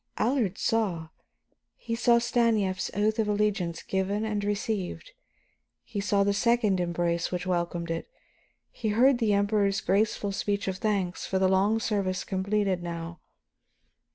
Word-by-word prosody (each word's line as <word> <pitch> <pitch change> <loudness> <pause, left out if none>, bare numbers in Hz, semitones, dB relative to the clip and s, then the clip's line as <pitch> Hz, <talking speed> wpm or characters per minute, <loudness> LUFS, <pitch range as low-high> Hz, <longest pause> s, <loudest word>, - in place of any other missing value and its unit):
Allard 225 -5 +1
saw. 185 -8 0 0.7
He 230 - -5
saw 235 0 +4
Stanief's 230 -5 +1
oath 215 +2 +1
of 220 - +1
allegiance 205 -5 0
given 195 +3 -1
and 210 -2 -2
received, 205 - -3 0.7
he 210 - -5
saw 200 0 +2
the 200 0 +2
second 220 -3 +2
embrace 170 -1 -1
which 180 0 -3
welcomed 175 -2 -2
it; 165 - -4 0.6
he 230 - -4
heard 240 +4 +4
the 220 -3 +2
Emperor's 200 -1 +2
graceful 205 +1 0
speech 200 +1 -2
of 190 -1 -2
thanks 200 -5 -1
for 190 - 0
the 190 0 +3
long 195 +4 +2
service 195 -4 -1
completed 195 -1 0
now. 170 0 -6
200 Hz, 140 wpm, -27 LUFS, 185-215 Hz, 0.7 s, saw